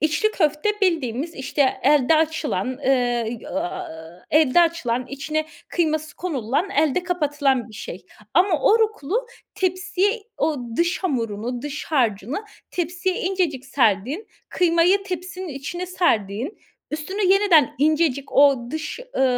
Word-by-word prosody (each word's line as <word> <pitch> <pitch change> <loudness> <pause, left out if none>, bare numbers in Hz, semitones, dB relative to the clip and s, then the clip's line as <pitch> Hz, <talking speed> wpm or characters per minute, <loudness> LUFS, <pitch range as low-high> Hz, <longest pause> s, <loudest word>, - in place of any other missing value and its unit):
İçli 310 +8 +2
köfte 305 0 +1
bildiğimiz, 320 - 0
işte, 265 +1 0
elde 290 +2 +4
açılan, 300 - -1
eee, 270 - +4 0.5
y - - -10
aaa, 160 0 -6
elde 310 +1 +5
açılan, 255 -8 +1
içine 305 +3 -3 0.2
kıyması 310 -2 -1
konululan, 295 - -1
elde 315 -3 +2
kapatılan 290 -8 0
bir 215 - -13
şey 185 - -8 0.3
ama 350 -2 +3
oruklu 435 - +2 0.3
tepsiye 375 +4 0 0.2
o 315 -2 +1 0.2
dış 345 +2 +1
hamurunu, 240 - -2
dış 295 0 -5
harcını 250 - 0 0.3
tepsiye 360 +2 -1
incecik 350 -8 -1
serdiğin, 265 - +1 0.2
kıymayı 355 +3 +3
tepsinin 365 -1 -5
içine 315 +6 -5
serdiğin, 245 - 0 0.3
üstüne 375 +7 -3
yeniden 360 - +4
incecik 300 -2 +1
o 270 -4 +4
dış, 315 - -4 0.2
ııı, 265 - +3
310 Hz, 120 wpm, -23 LUFS, 265-360 Hz, 0.5 s, elde